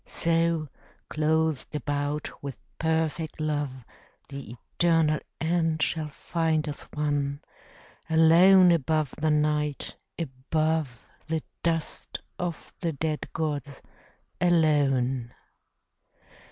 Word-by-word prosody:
So, 165 -1 +1 0.4
clothed 155 -1 0
about 145 +1 -2
with 140 -2 -6 0.2
perfect 160 0 -1
love, 145 -5 -2 0.4
The 140 -4 -7 0.2
eternal 165 -3 +4 0.2
end 160 -1 +1
shall 160 -2 0
find 160 +1 -1
us 150 - -5
one, 145 -1 0 0.7
Alone 175 +3 +7
above 155 -3 +1
the 155 - +2
Night, 150 -1 0 0.2
above 155 -2 -1 0.2
The 160 -1 -1 0.2
dust 165 -2 -2 0.2
of 175 -3 -4
the 165 -2 -1
dead 155 +2 -3
gods, 145 -3 -3 0.6
alone. 135 -8 +2
155 Hz, 90 wpm, -27 LUFS, 145-165 Hz, 0.7 s, Alone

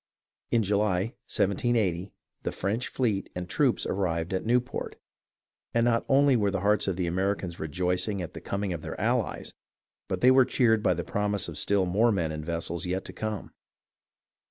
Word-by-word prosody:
In 115 -2 +3
July, 100 +1 +1 0.2
1780, 100 -3 +1 0.3
the - - -2
French 105 +6 -2
fleet 110 -7 -1
and 90 0 -4
troops - - +1
arrived 85 -3 -1
at 95 - -1
Newport, 125 +2 0 0.8
and 115 0 +4
not 115 -1 +2
only 140 0 +5
were 105 -4 +2
the 95 -2 -2
hearts 105 +1 +2
of 95 - 0
the 90 0 -1
Americans 95 0 -1
rejoiced 90 +5 0
at 95 -5 -4
the - - -8
coming 100 -2 -2
of 85 - -5
their - - -6
allies, - - -1 0.5
but - - -3
they 125 - +7
were 130 0 +7
cheered 115 -4 +3
by 90 - +2
the 85 - -3
promise 105 +1 -1
of 85 - -7
still 100 +3 +1
more 105 +7 +3
men 85 -6 0
and 75 0 -5
vessels 85 +1 -3
yet 90 +2 -2
to - - -8
come. 110 -2 -4
100 Hz, 180 wpm, -28 LUFS, 90-110 Hz, 0.8 s, they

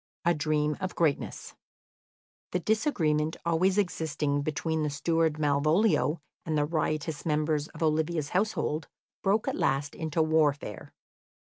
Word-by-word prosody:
A 170 - +5
Dream 150 -1 0
of 185 -1 -3
Greatness 160 -4 -1 1.0
The 180 - +2
disagreement 165 - +1
always 180 +4 +2
existing 150 -6 0
between 155 +2 -1
the 150 - 0
steward 160 +2 +1
Malvolio 155 +4 +2 0.3
and 155 -1 -1
the 145 - +2
riotous 155 -1 -2
members 150 -1 0
of - - -6
Olivia's 155 -1 +1
household 180 -6 0 0.3
broke 205 +2 +1
at - - +1
last 140 +2 0
into 160 0 0
warfare. 150 -7 0
155 Hz, 125 wpm, -29 LUFS, 150-170 Hz, 1.0 s, A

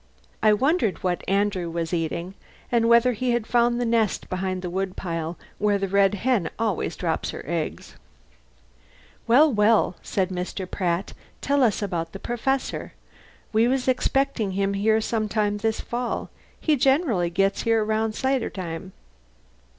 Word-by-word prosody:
I 215 - +5
wondered 240 - +1
what 180 -1 -1
Andrew 195 -3 0
was 165 0 -3
eating 170 +2 -2 0.4
and 230 -1 +3
whether 235 +1 +5
he 245 +2 0
had 240 -2 0
found 240 +1 +2
the 245 - 0
nest 230 -3 0
behind 185 0 -2
the 180 - -3
wood 190 +1 -2
pile 165 -2 -4 0.2
where 205 -1 +2
the 195 0 -2
red 200 +1 +3
hen 235 -3 +1
always 215 -6 -1
drops 165 -3 -2
her - - -6
eggs. 170 -2 -4 1.3
"Well, 275 +5 +6
well," 210 -3 +3
said 190 -2 -1
Mr. 185 +1 -4
Pratt, 180 0 -2 0.3
"tell 280 0 +1
us 220 -4 +2
about 165 -4 -3
the 195 - -7
Perfessor. 255 +4 -2 0.6
We 225 +2 +4
was 260 0 0
expectin' 255 -5 +1
him 195 +1 0
here 220 +2 +2
some 215 -1 -1
time 205 -1 0
this 220 +1 -1
fall. 240 0 -3 0.3
He 310 - +2
generally 265 - +2
gets 195 +3 +1
here 225 -1 +2
around 220 0 0
cider 265 -2 0
time." 185 0 -6
210 Hz, 155 wpm, -24 LUFS, 185-235 Hz, 1.3 s, Well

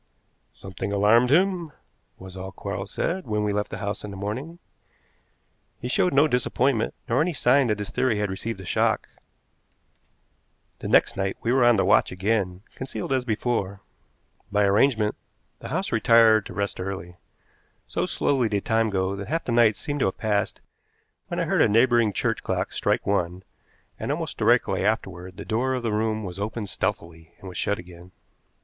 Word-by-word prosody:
"Something 95 +1 -6
alarmed 105 +5 +4
him," 175 0 +2 0.4
was 95 0 -11
all 95 0 -6
Quarles 100 0 -5
said 180 - -2
when 105 -1 0
we 105 -1 0
left 105 0 -1
the - - -6
house 100 0 -4
in 105 - -6
the 100 - -8
morning. 125 - -5 1.2
He 125 - -5
showed 155 +8 +2
no 145 +2 +5
disappointment, 125 -2 0
nor 125 +4 +2
any 170 +2 0
sign 130 -1 +3
that 105 -2 0
his 105 -1 -5
theory 130 -5 +1
had 105 -2 -1
received 100 +2 -4
a 95 - -9
shock. - - +1 1.7
The - - -5
next - - +4
night 95 0 -1
we 120 - +1
were 130 -1 +4
on 120 0 +6
the 100 - +2
watch - - +4
again, 95 -1 -1
concealed 130 -1 -4
as 130 -1 +1
before. 105 -4 -2 0.7
By 105 0 +3
arrangement, 105 +2 +3 0.5
the - - -8
house 185 +7 -2
retired 115 -1 +5
to - - -9
rest 100 -1 -2
early. 90 -2 -6 0.7
So - - -2
slowly 130 -5 +1
did 100 -2 -2
time 110 0 +2
go 95 -1 -1
that 100 0 -6
half 165 +2 -2
the - - -2
night 115 -2 +4
seemed 145 -1 -4
to - - +2
have 95 - -3
passed 105 -2 -1 0.7
when - - -3
I - - +1
heard - - +2
a - - +6
neighboring 115 0 +4
church - - -1
clock - - -2
strike - - 0
one, 90 -2 -1 0.6
and - - -2
almost - - -4
directly - - +2
afterward 90 +1 -2
the - - -7
door 125 +4 0
of 125 - -4
the 115 -2 -1
room 110 0 0
was 90 -1 -6
opened 105 0 -4
stealthily 85 -5 -4
and 95 - -11
was 90 - -6
shut 105 - 0
again. 90 0 -12
105 Hz, 180 wpm, -25 LUFS, 95-120 Hz, 1.7 s, on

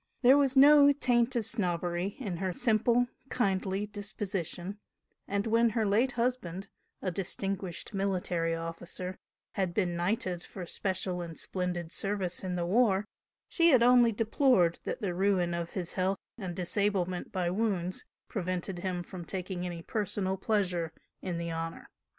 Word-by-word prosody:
There 255 +3 +8
was 275 -2 +3
no 285 +1 +8
taint 250 -3 +2
of 230 -3 0
snobbery 180 -2 -1
in 200 -10 -4
her 185 +1 -1
simple, 235 +4 +3 0.2
kindly 195 -3 0
disposition, 200 -2 -4 0.5
and 200 0 -1
when 230 +1 +4
her 220 - +2
late 230 +6 +2
husband, 230 -7 -2 0.3
a 185 - 0
distinguished 195 +1 -3
military 180 -4 0
officer, 170 +2 -5 0.3
had 185 -3 -2
been 180 -5 +1
knighted 180 0 -1
for 185 -3 -8
special 185 0 -2
and 165 -2 -7
splendid 180 -3 -3
service 195 -3 -1
in 185 -1 -2
the 175 -1 -1
war, 200 0 +3 0.4
she 335 0 +4
had 255 -6 +6
only 245 -1 +6
deplored 220 - +3
that - - -4
the 185 -3 0
ruin 180 -2 +2
of 170 0 -3
his 180 -3 -4
health 190 +1 0 0.2
and 185 -6 -5
disablement 185 -1 0
by 180 -2 0
wounds, 185 -3 -1 0.2
prevented 185 -2 -3
him 180 -1 -2
from 180 0 -8
taking 180 0 -4
any 170 -1 -6
personal 200 -2 -1
pleasure 185 -5 0 0.3
in 180 -2 -3
the 170 0 -3
"honour." 165 0 -5
190 Hz, 150 wpm, -30 LUFS, 175-215 Hz, 0.5 s, There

